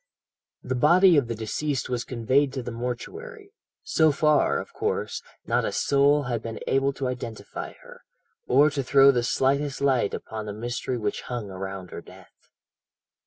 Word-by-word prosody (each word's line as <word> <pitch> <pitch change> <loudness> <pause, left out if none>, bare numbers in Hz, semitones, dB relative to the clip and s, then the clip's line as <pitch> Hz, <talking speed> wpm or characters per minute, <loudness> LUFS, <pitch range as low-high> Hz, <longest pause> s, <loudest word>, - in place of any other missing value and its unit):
"The 130 - -2
body 170 +8 +5
of 140 -5 +3
the 115 - -3
deceased 130 +5 -2
was 125 -1 -2
conveyed 130 +4 +1
to 130 -2 -4
the 120 - -5
mortuary. 400 - -6 0.3
So 160 - +3
far, 150 0 +2
of - - -9
course, - - -2 0.2
not - - +1
a - - -1
soul 145 +1 +3
had 120 -4 -2
been 115 -1 -6
able 135 +1 +2
to 135 -1 -3
identify 120 -3 -6
her, - - -14 0.5
or 145 +4 +5
to 140 -1 -1
throw 135 +1 +6
the 125 -3 0
slightest 135 +3 0
light 130 -7 +1
upon 110 -1 -7
the 105 - -4
mystery 120 +3 -3
which 105 -3 -2
hung 120 -5 -4
around 95 -1 -6
her - - -7
death. - - -18
130 Hz, 165 wpm, -25 LUFS, 115-145 Hz, 0.5 s, throw